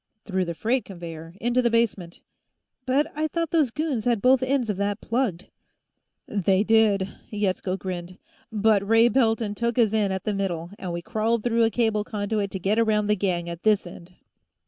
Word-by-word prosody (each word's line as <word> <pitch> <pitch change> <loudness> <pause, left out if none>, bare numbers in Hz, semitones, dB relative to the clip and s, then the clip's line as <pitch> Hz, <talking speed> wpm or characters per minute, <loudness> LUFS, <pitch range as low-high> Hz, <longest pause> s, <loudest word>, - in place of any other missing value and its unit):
"Through 190 -3 -1
the 170 -1 -4
freight 240 +8 0
conveyor, 165 -2 -9
into 240 +2 +1
the 240 - +2
basement." 220 -7 -1 0.7
"But 290 +5 +1
I 310 +1 0
thought 330 0 -2
those 310 -6 +3
goons 285 -4 -2
had 240 -3 +2
both 255 +3 +4
ends 260 -2 0
of 195 - -5
that 200 +1 -1
plugged." 225 -7 -2 0.8
"They 195 -1 +1
did," 215 -3 +3 0.2
Yetsko 190 -2 -1
grinned. 180 -1 -6 0.3
"But 215 -1 +3
Ray 225 +3 +4
Pelton 225 -4 +1
took 235 +2 -2
us 225 -3 +3
in 210 -3 +1
at 190 -1 -3
the 210 - -1
middle, 175 -4 -3
and 185 -2 -4
we 170 0 -4
crawled 220 +2 0
through 235 -1 +3
a - - +2
cable 220 -2 +1
conduit 205 -1 -2
to 190 - -5
get 200 +5 +1
around 215 -2 +2
the 210 - +4
gang 180 -3 -1
at 170 0 -6
this 215 -3 +2
end." 175 0 -12
210 Hz, 190 wpm, -25 LUFS, 190-235 Hz, 0.8 s, both